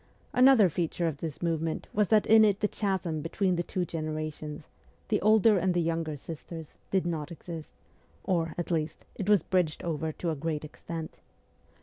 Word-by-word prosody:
Another 250 -5 +7
feature 170 +1 -1
of 155 -4 -2
this 160 +1 -5
movement 165 -1 -1
was 210 -1 +2
that 215 +1 +4
in 220 0 +7
it 205 -2 +3
the 210 - +3
chasm 185 -7 -1
between 180 +3 0
the 175 - 0
two 180 +1 -2
generations 155 -2 -5 0.4
the 210 - +2
older 215 -1 +5
and 180 0 +1
the - - +3
younger 165 -2 -1
sisters 160 +1 -8 0.2
did 190 -2 +1
not 160 -2 -3
exist; 165 -1 -8 0.5
or, 165 -4 0
at 175 0 -3
least, 155 -1 -2
it 200 0 -4
was 205 -6 +5
bridged 180 -5 0
over 160 -1 -2
to 165 +2 -3
a - - -2
great 155 +1 -3
extent. 160 +1 -7
165 Hz, 180 wpm, -29 LUFS, 155-190 Hz, 0.5 s, Another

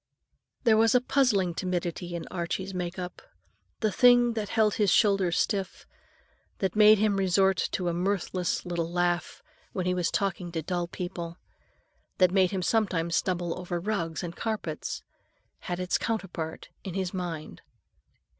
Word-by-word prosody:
There 225 -3 +5
was 225 +1 +4
a - - +7
puzzling 245 -9 +2
timidity 175 -1 -3
in 170 - -5
Archie's 185 +2 -3
make 180 0 -4
up. 180 -1 -6 0.6
The 215 -2 +2
thing 245 +1 +5
that 215 -3 -3
held 215 -2 +3
his 210 -2 +2
shoulders 195 -4 +3
stiff, 195 -3 -1 0.7
that 190 -1 -1
made 215 0 +7
him 205 -1 +2
resort 190 0 +2
to 180 - -1
a 170 - +1
mirthless 185 0 -1
little 170 -1 -2
laugh 175 0 -1 0.3
when 185 - -2
he 180 - +1
was 180 -2 0
talking 185 -3 -2
to 160 -2 -2
dull 175 +1 -2
people, 175 -1 -6 0.8
that 185 -1 +5
made 190 -1 +4
him 190 -1 -2
sometimes 175 -6 +1
stumble 175 -2 0
over 175 -1 -3
rugs 170 -4 -2
and 170 -1 -5
carpets, 210 -9 -4 0.6
had 175 0 -4
its 180 0 0
counterpart 190 -8 -4
in 190 -3 -6
his 190 -1 -2
mind. 175 -4 -5
185 Hz, 155 wpm, -28 LUFS, 175-205 Hz, 0.8 s, a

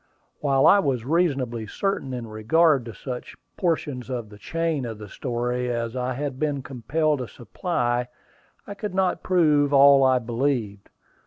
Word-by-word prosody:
While 135 -2 +2
I 200 - +7
was 130 - -1
reasonably 135 -8 0
certain 195 - -2
in 125 -2 -4
regard 125 +6 +2
to 115 - -6
such 125 -2 -7 0.2
portions 150 -8 -2
of 120 -4 -4
the 105 0 -14
chain 165 +2 -2
of 115 -3 -5
the 105 -1 -9
story 125 +2 -2
as 115 0 -3
I 125 0 -2
had 140 -1 -4
been 145 -3 -1
compelled 145 +4 -1
to 125 - -4
supply, 120 - -2 0.6
I 200 - -7
could 200 -2 -6
not 190 -1 +1
prove 150 -6 +3
all 140 0 +7
I 130 -1 +4
believed. 120 -4 -2
130 Hz, 160 wpm, -24 LUFS, 120-155 Hz, 0.6 s, I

